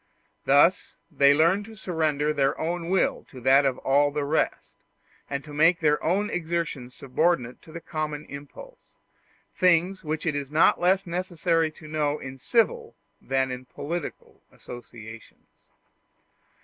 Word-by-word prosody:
Thus 145 +7 +3
they 140 -2 +5
learn 165 +7 +3
to 225 +1 -12
surrender 155 -6 -1
their 140 -1 0
own 170 +1 -3
will 190 0 +1
to 130 - -11
that 135 +3 +5
of 130 - -1
all 145 +2 +2
the 145 0 -2
rest, 155 +3 -2 0.5
and 140 0 -3
to 150 - -11
make 165 +4 +4
their 150 -2 +1
own 195 +5 +1
exertions 160 -7 -3
subordinate 135 -2 0
to 160 - -15
the 165 +1 -8
common 155 -2 -4
impulse 485 - -12 0.6
things 180 +1 +2
which 155 +1 -3
it 165 - +1
is 140 -2 -4
not 155 +2 +3
less 190 +2 +3
necessary 170 -2 0
to 155 - -13
know 150 -1 -1
in 135 -1 -9
civil 450 - 0 0.3
than 130 -1 0
in 125 0 -6
political 150 +6 -6
associations. 115 -2 -13
155 Hz, 145 wpm, -26 LUFS, 140-175 Hz, 0.6 s, they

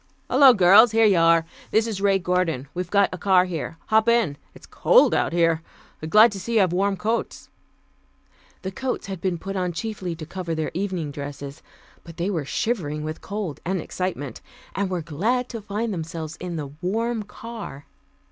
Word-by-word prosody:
"Hello, 275 -2 +8
girls, 210 +2 +6
here 225 0 +5
you 200 -4 +4
are. 165 0 +4 0.2
This 220 +1 +2
is 215 -4 -4
Ray 200 -1 +3
Gordon. 180 -7 -1
We've 180 0 -4
got 200 -1 +3
a 185 - -6
car 185 0 +4
here. 165 -2 -5
Hop 220 +1 +4
in, 230 -11 +2 0.2
it's - - -14
cold - - +4
out - - +1
here. 165 -2 +2 0.5
Glad 215 +5 +7
to 200 - -6
see 235 +4 -4
you 215 - +5
have 185 -3 +2
warm 195 +2 +1
coats." 225 +4 -3 1.1
The 190 - -3
coats 260 +6 -3
had 190 -3 -6
been 185 -3 -1
put 195 +4 -6
on 180 -2 -1
chiefly 185 -2 -4
to 160 -1 -8
cover 170 0 -4
their 155 -1 -2
evening 180 -5 -3
dresses, 140 0 -7 0.4
but 165 -1 -12
they 180 +4 -1
were 160 -7 -2
shivering 155 - -2
with 155 +1 -5
cold 200 -7 -5
and 185 +1 -1
excitement, 160 -8 -4 0.3
and 195 -1 -1
were 180 -3 -2
glad 220 - -1
to 230 -2 -6
find 210 +2 -3
themselves 160 -2 -5
in 175 -1 -5
the 145 -4 -5
warm 225 +5 -1
car. 210 -9 -9
185 Hz, 185 wpm, -24 LUFS, 165-215 Hz, 1.1 s, Hello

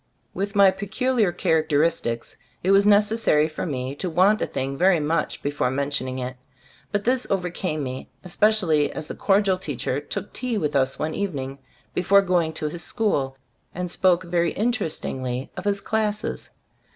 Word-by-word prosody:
With 200 +1 -3
my 200 -1 +7
peculiar 215 +2 0
characteris 160 0 +2
tics 115 0 -4 0.3
it 185 - +3
was 200 +1 +5
necessary 205 -7 +4
for 155 +3 -5
me 130 -3 -3
to 185 - -2
want 190 +6 +3
a - - 0
thing 135 +1 -3
very 180 +2 +4
much 150 +1 -1
before 145 -3 0
mentioning 130 -1 -2
it; 130 0 -5 0.5
but 205 -1 0
this 250 +2 +1
overcame 180 -4 -1
me, 130 0 -6
especially 180 -6 +2
as - - -6
the - - -6
cordial 195 -2 +2
teacher 140 -5 -2
took 150 +7 -6
tea 250 -3 -2
with 150 -7 -1
us 135 -1 +2
one 155 +1 -2
evening 140 -9 -3 0.3
before 200 +2 +4
going 175 -4 +1
to 155 -1 -3
his 165 +3 -5
school, 140 - 0 0.4
and 180 0 -3
spoke 185 -1 +3
very 170 -1 0
in 230 +4 +1
terestingly 130 - -3
of - - -7
his 200 -1 0
classes. 215 -1 -2
175 Hz, 165 wpm, -24 LUFS, 145-200 Hz, 0.5 s, my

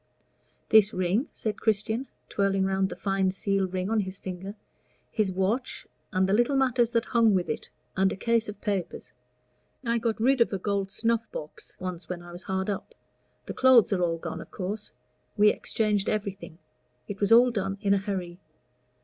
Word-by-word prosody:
"This 215 -1 +6
ring," 185 - +1
said 215 -2 -4
Christian, 220 +4 0 0.2
twirling 195 -1 +1
round 190 0 +1
the - - -6
fine 195 -1 0
seal 195 0 0
ring 185 0 -3
on 220 +1 +1
his 190 -1 -3
finger, 190 +2 -7 0.6
"his 210 -3 +1
watch, 195 +7 -1 0.3
and 190 -2 +2
the 195 - +1
little 240 +6 +3
matters 250 -3 +3
that 230 0 +2
hung 230 -4 +3
with 180 -2 0
it, - - -4 0.3
and 190 0 +3
a - - -3
case 230 +2 +1
of 210 -1 -8
papers. 200 -5 -3 0.7
I 235 0 +1
got 225 -1 -1
rid 260 +2 +3
of 235 - +4
a 195 - -1
gold 195 0 -1
snuff 230 +2 0
box 150 0 -9
once 180 -1 -5
when 175 -1 -5
I 175 - -11
was 175 +1 -8
hard 190 0 -2
up. 205 - -4 0.5
The - - -5
clothes 255 -5 +5
are 185 - 0
all 165 -1 +1
gone, 165 0 -6
of - - -12
course. 205 +2 -5 0.5
We 210 0 +7
exchanged 210 -3 0
everything; 200 -5 -4 0.5
it 200 -1 -6
was 200 0 +1
all 245 +2 +7
done 195 -3 -2
in 200 0 +2
a 200 - +3
hurry. 185 -3 -4
200 Hz, 185 wpm, -27 LUFS, 190-225 Hz, 0.7 s, We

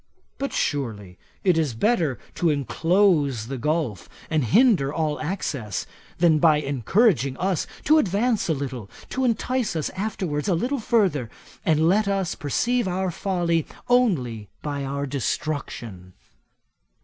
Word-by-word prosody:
But, 275 0 -2
surely, 105 - -2 0.2
it 180 -4 +3
is 145 -8 -1
better 165 - +1 0.2
to 175 - +1
enclose 150 - +2
the 135 - -3
gulf, 150 - -1 0.2
and 155 -3 +2
hinder 185 - +4
all 155 -2 -1
access, 145 - -3 0.3
than 165 -3 +4
by 155 -1 +5
encouraging 140 - +2
us 185 -2 -1 0.2
to 310 +2 +5
advance 215 - +1
a - - +4
little, 130 -7 -5 0.2
to 260 - -2
entice 250 -2 0
us 155 - -2
afterwards 185 -6 -3
a 185 - +3
little 255 +10 -1
further, 195 - +1 0.3
and 160 0 +3
let 200 +4 +3
us 195 -3 0
perceive 235 - 0
our 185 0 -1
folly 170 -4 0 0.2
only 130 - +1
by 145 -2 -3
our 140 +1 -2
destruction. 125 -9 -4
160 Hz, 135 wpm, -24 LUFS, 135-195 Hz, 0.3 s, by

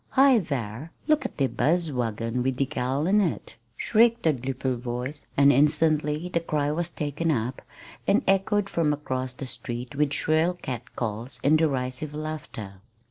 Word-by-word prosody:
"Hi, 270 -3 +7
thar, 135 - -4 0.2
look 305 -4 +3
at - - -5
de 140 - +3
buz 165 +4 +2
wagon 115 -1 -2
wid 130 +1 0
de 140 - +1
gal 135 +1 -1
in 205 +4 +4
it!" 175 -6 -2 0.2
shrieked 230 0 +3
a 160 - +5
gleeful 130 0 -2
voice, 125 +4 -5
and 140 0 +6
instantly 150 +2 +2
the 175 -1 0
cry 150 -3 -1
was 170 +2 -1
taken 150 +1 -2
up 125 -3 -1 0.5
and 200 +2 +3
echoed 195 +1 +2
from 160 -5 +1
across 130 -3 -3
the 135 - -6
street 120 0 -4
with 145 0 +1
shrill 160 +4 +2
catcalls 120 -4 -5
and 155 +3 +5
derisive 140 -1 -1
laughter. 140 -11 -6
145 Hz, 160 wpm, -26 LUFS, 125-165 Hz, 0.5 s, Hi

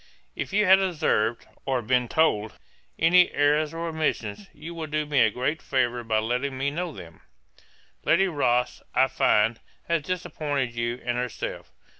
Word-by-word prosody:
'If - - -4
you 210 +1 +3
have 190 0 +7
observed, 150 - 0 0.2
or 130 -3 -1
been 125 +2 +1
told, 110 -8 +1 0.4
any 180 +2 +5
errours 145 +1 +2
or 165 +1 -4
omissions, 110 -11 -2
you 165 +3 -9
will 165 -2 -5
do 150 0 -1
me 145 -2 +1
a 110 - +5
great 130 +8 -2
favour 125 -2 0
by 110 -1 0
letting 125 +5 -1
me 140 +2 -1
know 175 +3 -3
them. 85 - -12 0.8
'Lady 190 +4 +3
Rothes, 125 -7 0
I 130 - +5
find, 115 -2 +2 0.3
has 170 -1 +1
disappointed 145 -6 -3
you 120 +1 -2
and 120 0 -1
herself. 125 -2 -5
140 Hz, 160 wpm, -25 LUFS, 120-160 Hz, 0.8 s, have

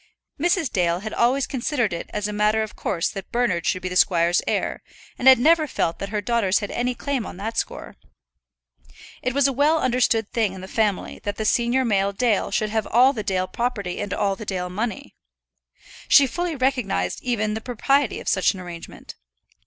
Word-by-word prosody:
Mrs. 345 -2 +1
Dale 175 -2 +1
had 215 +1 -6
always 255 +3 +2
considered 245 - -1
it 170 - -6
as 210 0 -2
a 210 - -5
matter 210 +1 +2
of 215 -3 -8
course 170 -2 -1
that 195 -1 -8
Bernard 220 -9 0
should 185 - 0
be - - -2
the 180 - -5
squire's 175 -1 +3
heir, - - -1 0.4
and 255 - +1
had 260 -1 +9
never 310 +5 +4
felt 165 - -2
that 195 - -4
her 210 0 -2
daughters 220 -5 +1
had 205 - -3
any 245 +1 -1
claim 275 -1 -2
on - - -8
that 220 +4 -4
score. - - -4 1.2
It 255 +1 -2
was 280 -1 +4
a 275 - -1
well 295 +5 +3
understood 245 -5 +1
thing 220 -5 0
in 190 - -9
the 190 - -8
family 210 -2 -1
that 205 0 -3
the 220 - -4
senior 240 +4 +2
male 200 -3 +1
Dale 225 -1 +1
should 215 -2 -1
have 220 -1 -1
all 255 +4 +5
the 225 - -4
Dale 185 -2 -1
property 205 -5 -3
and 205 -1 -4
all 195 -1 0
the 215 - -8
Dale 180 -3 -3
money. 235 +8 -4 0.9
She 280 - +7
fully 345 +5 -3
recognized 250 - -1
even 215 -4 -1
the 220 - -4
propriety 255 +3 0
of - - -11
such 190 +1 +2
an - - -8
arrangement. 175 -2 -9
220 Hz, 200 wpm, -23 LUFS, 195-255 Hz, 1.2 s, had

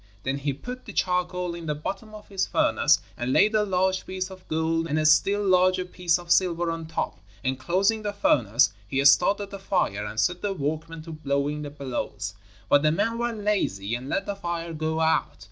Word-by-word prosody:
Then 135 +1 -1
he 140 +1 -1
put 250 - -8
the 210 - -9
charcoal 180 -1 0
in 170 -1 -7
the 150 - 0
bottom 195 +8 -6
of 210 - -12
his 195 -2 -1
furnace - - +3
and 120 +1 -2
laid 210 +10 +4
a 215 -1 +3
large 185 -1 0
piece 185 0 -4
of 185 -1 -13
gold 160 +1 0
and 155 0 -1
a 155 - +1
still 200 +6 +4
larger 185 0 +3
piece 180 -1 +1
of 175 -1 -8
silver 175 -2 +3
on 165 -1 -5
top, 105 - -3 0.2
and 130 0 -1
closing 195 +9 +1
the 205 -1 -2
furnace, 120 - +3
he 135 +5 0
started 200 +8 +4
the 200 - -7
fire 180 - 0
and 110 +1 -4
set 180 +11 +1
the 205 -1 -1
workmen 160 0 -4
to 165 - -9
blowing 145 -1 -1
the 145 - -5
bellows; 125 -8 -4 0.3
but 145 - +5
the 155 0 +3
men 230 +8 0
were 240 0 0
lazy 200 - -1
and 125 +3 -4
let 195 +5 -1
the 200 - -3
fire 170 -3 -4
go 160 +1 -1
out. 160 0 +1
170 Hz, 210 wpm, -26 LUFS, 145-195 Hz, 0.3 s, but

